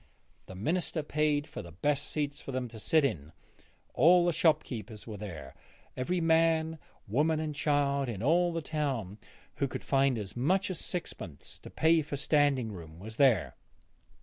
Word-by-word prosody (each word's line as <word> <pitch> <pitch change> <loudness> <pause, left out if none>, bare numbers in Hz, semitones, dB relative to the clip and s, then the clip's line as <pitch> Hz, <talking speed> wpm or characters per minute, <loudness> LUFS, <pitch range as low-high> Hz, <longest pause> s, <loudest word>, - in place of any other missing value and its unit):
The 95 - -9
minister 160 - -1
paid 150 0 0
for 145 - -8
the 85 -4 -11
best 140 - +1
seats 145 -1 -2
for - - -7
them 130 -1 -2
to 115 -1 -10
sit 155 +6 +3
in. 80 - -3 0.6
All 175 +5 +5
the 175 - +3
shopkeepers 125 -9 0
were 110 -3 -7
there; 95 -6 -8 0.4
every 175 +8 -1
man, 160 -1 +2 0.3
woman 150 +9 +1
and 155 -1 -3
child 140 -2 +1
in 105 -2 -5
all 175 +5 +3
the 165 -1 -3
town 130 - -3 0.4
who 140 - +1
could - - -6
find 135 -2 +2
as 105 -2 -6
much 185 +10 +1
as 180 - -3
sixpence 95 - -5
to - - -11
pay 160 0 +3
for 145 -1 -5
standing 140 -5 +2
room 80 -4 -10
was 110 +5 -8
there. 130 -9 +3
140 Hz, 170 wpm, -30 LUFS, 110-160 Hz, 0.6 s, All